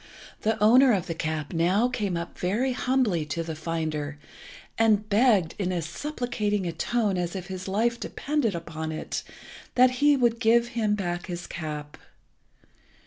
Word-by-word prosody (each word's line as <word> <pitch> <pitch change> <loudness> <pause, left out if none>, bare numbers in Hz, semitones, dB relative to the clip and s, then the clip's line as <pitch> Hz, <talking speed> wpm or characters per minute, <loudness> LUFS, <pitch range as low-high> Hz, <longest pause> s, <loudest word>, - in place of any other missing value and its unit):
The 220 +1 +1
owner 245 +4 +6
of 185 -4 0
the 165 - -3
cap 155 -1 -3
now 180 +8 +3
came 210 -8 -2
up 170 +1 -6
very 220 +9 0
humbly 250 -10 +1
to 150 +3 -3
the 160 -1 -5
finder, 155 -2 -3 0.6
and 215 -2 +3
begged, 210 -5 +3
in 185 -2 0
as 170 -4 -2
supplicating 215 - -2
a 170 - -1
tone 205 +3 0
as 175 +1 -3
if 185 -1 -6
his 185 0 -6
life 230 +5 +1
depended 275 - -1
upon 160 -1 -5
it, 155 - -4 0.5
that 255 0 +6
he 290 -1 +5
would 235 -2 +2
give 235 +2 +3
him 220 -3 0
back 175 -3 -3
his 175 -1 -5
cap. 150 -3 -6
195 Hz, 160 wpm, -26 LUFS, 170-235 Hz, 0.6 s, owner